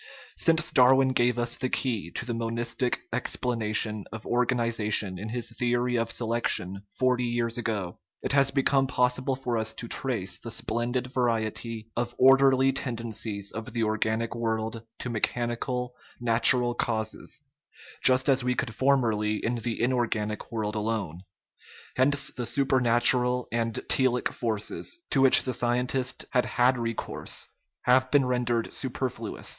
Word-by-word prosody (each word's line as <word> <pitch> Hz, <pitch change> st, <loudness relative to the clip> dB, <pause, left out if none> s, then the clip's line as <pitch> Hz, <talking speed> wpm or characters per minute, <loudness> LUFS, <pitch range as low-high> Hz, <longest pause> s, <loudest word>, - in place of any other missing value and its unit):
Since 165 Hz, 0 st, +2 dB
Darwin 130 Hz, 0 st, +5 dB
gave 120 Hz, -1 st, +2 dB
us 120 Hz, 0 st, +1 dB
the 130 Hz, -, -2 dB
key 115 Hz, -, -1 dB
to 120 Hz, -, -4 dB
the 120 Hz, -, -3 dB
monistic 115 Hz, +2 st, -2 dB
explanation 110 Hz, -4 st, -1 dB
of 110 Hz, -1 st, -8 dB
organization 115 Hz, -6 st, 0 dB
in 110 Hz, +3 st, -6 dB
his 120 Hz, +1 st, -3 dB
theory 120 Hz, 0 st, 0 dB
of 115 Hz, 0 st, -1 dB
selection 110 Hz, -5 st, -1 dB, 0.2 s
forty 125 Hz, -1 st, +1 dB
years 120 Hz, 0 st, -1 dB
ago, 105 Hz, -7 st, -3 dB, 0.2 s
it -, -, -1 dB
has 140 Hz, -1 st, +4 dB
become 135 Hz, 0 st, +2 dB
possible 130 Hz, +1 st, 0 dB
for 125 Hz, -3 st, -2 dB
us 110 Hz, 0 st, -3 dB
to 120 Hz, -, -6 dB
trace 110 Hz, -9 st, -2 dB
the 115 Hz, -, -8 dB
splendid 120 Hz, +3 st, -2 dB
variety 115 Hz, -2 st, -2 dB
of 120 Hz, 0 st, -3 dB
orderly 135 Hz, 0 st, +5 dB
tendencies 110 Hz, -5 st, -4 dB
of 110 Hz, -1 st, -7 dB
the 115 Hz, -1 st, 0 dB
organic 110 Hz, +1 st, -1 dB
world 115 Hz, -1 st, -2 dB, 0.2 s
to 125 Hz, -, -5 dB
mechanical, 120 Hz, +2 st, -2 dB, 0.3 s
natural 120 Hz, +1 st, +5 dB
causes, 110 Hz, -2 st, -2 dB, 0.6 s
just 130 Hz, +1 st, +6 dB
as 135 Hz, -2 st, +3 dB
we 125 Hz, 0 st, 0 dB
could 130 Hz, -5 st, -2 dB
formerly 115 Hz, -5 st, +1 dB
in 120 Hz, +3 st, -2 dB
the 115 Hz, 0 st, -3 dB
inorganic 115 Hz, -4 st, -1 dB
world 110 Hz, -2 st, -2 dB
alone. 105 Hz, -6 st, -3 dB, 0.8 s
Hence 140 Hz, +2 st, +2 dB
the 125 Hz, -2 st, -3 dB
supernatural 125 Hz, -2 st, +2 dB
and 115 Hz, -1 st, -1 dB
telic 130 Hz, -2 st, +2 dB
forces, 110 Hz, -, -3 dB
to 135 Hz, -, +3 dB
which 135 Hz, -1 st, +8 dB
the 130 Hz, -, -2 dB
scientist 125 Hz, +2 st, -1 dB
had 125 Hz, -, +1 dB
had 125 Hz, +1 st, +2 dB
recourse, 115 Hz, -1 st, -3 dB, 0.3 s
have 130 Hz, +1 st, +3 dB
been 140 Hz, -1 st, +3 dB
rendered 120 Hz, -2 st, -1 dB
super 130 Hz, 0 st, -2 dB
fluous. 115 Hz, -3 st, -7 dB
120 Hz, 140 wpm, -27 LUFS, 110-125 Hz, 0.8 s, which